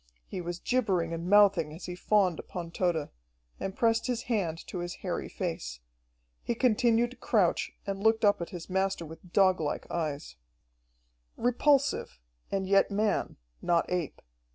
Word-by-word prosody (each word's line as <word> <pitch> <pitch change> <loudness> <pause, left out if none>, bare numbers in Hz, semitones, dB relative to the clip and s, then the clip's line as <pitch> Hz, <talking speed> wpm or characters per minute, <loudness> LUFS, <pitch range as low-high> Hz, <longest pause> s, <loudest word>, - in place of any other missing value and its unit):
He 180 - -5
was 175 0 -4
gibbering 185 -8 0
and 165 +2 -4
mouthing 195 -6 +5
as 170 - -9
he 180 - -5
fawned 185 -1 +2
upon 170 -2 -6
Tode 170 -4 0 0.5
and 195 - -4
pressed 230 +1 +2
his 245 -1 -1
hand 190 -9 -1
to 180 - -6
his 175 0 -4
hairy - - -2
face. - - -4 0.6
He 235 - -2
continued 240 0 +3
to 255 - -13
crouch 210 - +1
and 195 0 -3
looked 220 +1 +3
up 205 -3 +3
at 170 - -4
his 175 -4 -8
master 190 -2 0
with 165 +3 -12
doglike 185 -6 +2
eyes. 155 - -3 1.0
Repulsive, 255 - +2 0.3
and 195 -1 0
yet 195 0 +4
man, 205 0 0 0.2
not 170 -1 +2
ape. 180 -5 -3
190 Hz, 155 wpm, -29 LUFS, 170-220 Hz, 1.0 s, mouthing